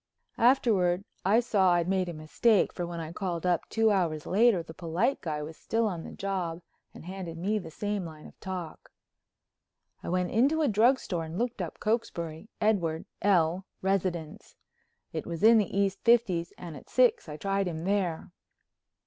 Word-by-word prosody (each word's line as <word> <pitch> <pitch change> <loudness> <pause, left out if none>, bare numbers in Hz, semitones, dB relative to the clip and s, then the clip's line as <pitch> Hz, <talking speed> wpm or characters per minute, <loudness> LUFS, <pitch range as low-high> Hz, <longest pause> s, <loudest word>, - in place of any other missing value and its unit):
Afterward 205 -7 +3 0.2
I 210 +5 +4
saw 195 -6 +3
I'd 175 -1 +1
made 185 -1 0
a - - -5
mistake, 175 +8 +2
for, 175 -1 -4
when 170 -1 -5
I 160 -1 -5
called 180 -3 -3
up 175 -2 +1
two 225 -1 +3
hours 165 -6 0
later 205 -3 +3
that 160 - -11
polite 175 - -1
guy 150 -3 -3
was 155 +1 -8
still 230 0 0
on 175 -6 -3
the - - -8
job 180 -4 -3 0.3
and - - -12
handed 180 -3 -6
me 205 +5 0
the 180 - -9
same 205 +4 -3
line 155 -2 -10
of - - -15
talk. 185 -4 -7 1.1
I - - -6
went 180 0 0
into 285 +8 +3
a - - +3
drugstore 220 -6 +2
and 160 +2 -7
looked 240 -2 -2
up 170 - -6
Cokesbury—Edward 180 -4 -1 0.2
L., 185 -2 +2 0.2
residence. 185 -5 -2 0.6
It - - -4
was 170 +1 -5
in 225 +1 +8
the 210 - 0
East 195 -1 +1
Fifties 210 -8 +3
and 170 -3 -8
at 135 - -13
six 250 -9 +3
I 150 - -6
tried 195 +2 -1
him 160 -2 -4
there. 185 -4 -1
185 Hz, 175 wpm, -29 LUFS, 170-215 Hz, 1.1 s, in